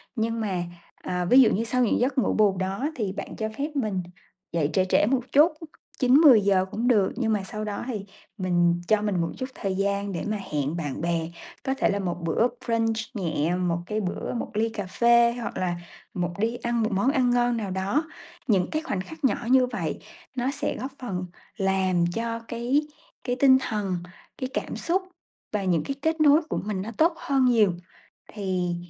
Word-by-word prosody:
nhưng 230 0 -1
mà, 190 -5 -1 0.4
ờ, 180 0 -2
ví 260 +2 +8
dụ 235 - +6
như 220 - 0
sau 250 +2 +1
những - - +1
giấc 255 +3 0
ngủ 255 - +2
bù 205 -3 +3
đó 195 +10 -1
thì 210 -5 -2
bạn 195 - -6
cho 220 0 -2
phép 290 +3 -2
mình 210 -9 -1 0.5
dậy 155 -4 +1
trễ 185 +2 +3
trễ - - +4
một 255 +3 +1
chút, 300 +5 +6 0.5
9:00-10:00 245 - +6
cũng 235 +3 -1
được. 210 -6 +3
Nhưng 225 -2 0
mà 205 -2 0
sau 215 +3 -5
đó 205 -1 -4
thì 215 -6 -4 0.3
mình 175 -2 +2
cho 215 -1 +3
mình 205 -4 0
một 165 - -1
chút 260 0 -4
thời 195 -1 -2
gian 200 +1 -1
để 175 - -3
mà 215 0 -1 0.2
hẹn 145 +1 -1
bạn 145 -5 -4
bè, 165 -1 -1 0.3
có 265 - 0
thể 270 - +1
là 200 -1 0
một 180 -2 -3
bữa 165 +8 +2 0.2
brunch 225 -1 +1 0.2
nhẹ, 170 - -1
một 175 -2 0
cái 215 +3 -2
bữa 185 -2 -3
một 240 - -4
ly 220 +2 +1
cà 215 -3 -5
phê 235 +4 +4
hoặc - - -5
là 180 -1 -1 0.4
một 175 -1 -2
đi 225 +3 0
ăn 235 -1 -1
một 220 - 0
món 200 +7 +2
ăn 255 -4 +2
ngon 245 -1 +2
nào 205 -4 -3
đó. 195 - 0 0.4
Những 195 -6 +2
cái 310 - -1
khoảnh 205 - -3
khắc 320 +10 -11
nhỏ 265 - +3
như 260 0 +6
vậy 175 -11 -3 0.4
nó 255 +1 0
sẽ 290 +1 -2
góp 265 +2 -5
phần 185 -8 -4 0.3
làm 190 -3 +2
cho 230 +1 -2
cái 250 +6 0 0.4
cái 245 -1 -1
tinh 265 -1 +7
thần, 205 -6 -2 0.4
cái 255 - -3
cảm - - -3
xúc 360 +3 0 0.5
và 210 -2 -1
những 175 -5 +1
cái 275 - -3
kết 320 +1 0
nối 300 +1 +6
của - - -1
mình 205 -3 -2
nó 215 +4 -5
tốt 330 +2 +4
hơn 270 -2 +1
nhiều 220 -7 +4 0.6
thì 185 -4 -1
215 Hz, 205 wpm, -26 LUFS, 185-250 Hz, 0.6 s, ví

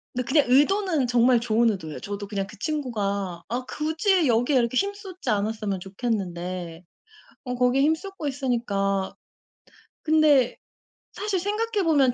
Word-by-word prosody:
근데 250 -1 -1
그냥 285 +1 +4
의도는 310 0 +3
정말 245 0 +4
좋은 230 0 +2
의도예요. 160 -6 -6
저도 205 0 -6
그냥 195 -2 -3
그 210 - -13
친구가 200 - -2
아 245 +4 -3
굳이 320 +2 +1
여기에 245 +4 +2
이렇게 235 +1 +1
힘 400 +7 +1
쏟지 380 -3 -8
않았으면 210 -2 -1
좋겠는데 180 -4 -4 0.6
어 250 0 -3
거기에 250 +2 +3
힘 315 +2 +4
쏟고 385 -5 -6
있으니까 205 -8 -1 0.9
근데 305 -5 +4 0.5
사실 405 -3 -2
생각해 420 +1 -1
보면 280 -6 +3
245 Hz, 310 characters per minute, -25 LUFS, 200-310 Hz, 0.9 s, 그냥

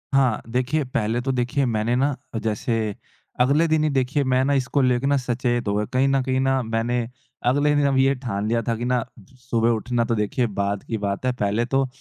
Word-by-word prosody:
हाँ, 130 -6 +3
देखिए 130 +5 0
पहले 115 -2 -1
तो 135 +1 -1
देखिए 130 +2 0
मैंने 115 0 0
ना, 135 +2 +1 0.2
जैसे 110 -1 -1 0.4
अगले 145 +6 +3
दिन 155 -1 +2
ही 155 - +2
देखिए 135 +1 +1
मैं 130 0 +2
ना 140 - +2
इसको 135 +1 +1
लेके 125 +1 +2
ना 140 0 +3
सचेत 120 -2 -1
हो 100 - +1
गया, 105 +1 0
कहीं 130 +2 +3
न 135 -1 +2
कहीं 130 0 0
ना 135 0 +2
मैंने 115 +1 -1 0.4
अगले 145 +4 +3
दिन 145 -1 +2
अब 135 - +1
ये 135 +1 +4
ठान 110 -5 -3
लिया 115 +1 +1
था 115 - +1
कि 120 +2 -4
ना 125 -2 +1 0.3
सुबह 120 -2 0
उठना 120 +1 0
तो 115 -1 0
देखिए 110 +4 0
बाद 100 0 -1
की 115 - -3
बात 100 +3 -3
है, 130 - +2
पहले 105 +1 0
तो 135 +1 +1
125 Hz, 220 wpm, -23 LUFS, 115-135 Hz, 0.4 s, ये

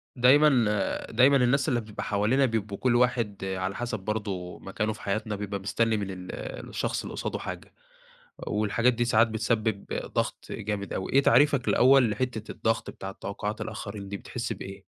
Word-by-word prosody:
دايمًا، 130 0 +5
آآ، 105 -1 -1
دايمًا 130 +5 +5
الناس 135 +4 +2
اللي 120 -3 +1
بتبقى 105 -1 -7
حوالينا 110 +7 +2
بيبقوا 110 -4 -2
كُلّ 125 +2 +2
واحد 120 -5 +1
على 95 0 -2
حَسَب 120 -3 -3
برضه 95 -3 -4
مكانه 105 +3 -2
في - - -13
حياتنا 105 +1 -2
بيبقى 100 0 -4
مستني 110 +3 +1
من 100 -2 -3
ال 90 -1 -7 0.4
الشخص - - -2
اللي - - -7
قصادُه - - -3
حاجة، - - -7 0.7
والحاجات 110 +4 +2
دي 120 +1 +1
ساعات 115 -1 +4
بتسبِّب 110 -2 -1 0.3
ضغط - - -1
جامد 100 -2 -4
أوي، 95 - -4
إيه 140 - +5
تعريفَك 140 -3 +4
الأول 130 -2 +5
لحتّة 110 0 -3
الضغط 115 0 -1
بتاعة 95 0 -7
توقعات 105 +2 -5
الآخرين 100 -1 -6
دي 100 - -4
بتحس - - -4
بإيه؟ - - -8
110 Hz, 170 wpm, -27 LUFS, 100-120 Hz, 0.7 s, دايمًا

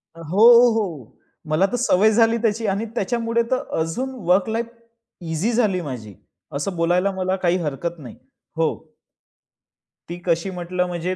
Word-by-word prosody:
अ, 165 - -11
हो, 180 +7 +1 0.3
हो. 165 - -4 0.4
मला 160 +5 +3
तर - - -1
सवय 215 -3 +3
झाली 225 +1 +3
त्याची 225 -1 0
आणि 200 +3 -1
त्याच्यामुळे 230 +1 0
तर 255 - +1 0.2
अजून 245 +12 -2 0.2
वर्क 185 +4 +3
लाईफ 230 +1 -2 0.6
ईझी 170 +9 0
झाली 210 -6 +1
माझी, 125 -9 -7 0.4
असं 180 +7 -3
बोलायला 175 +3 +1
मला 185 0 -1
काही 175 +1 +3
हरकत 160 +4 -4
नाही. 125 -6 -10 0.4
हो. - - -2 1.2
ती 175 - -5
कशी 170 +1 0
म्हंटलं 180 0 -2
म्हणजे? 175 +1 -3
185 Hz, 150 wpm, -22 LUFS, 165-220 Hz, 1.2 s, मला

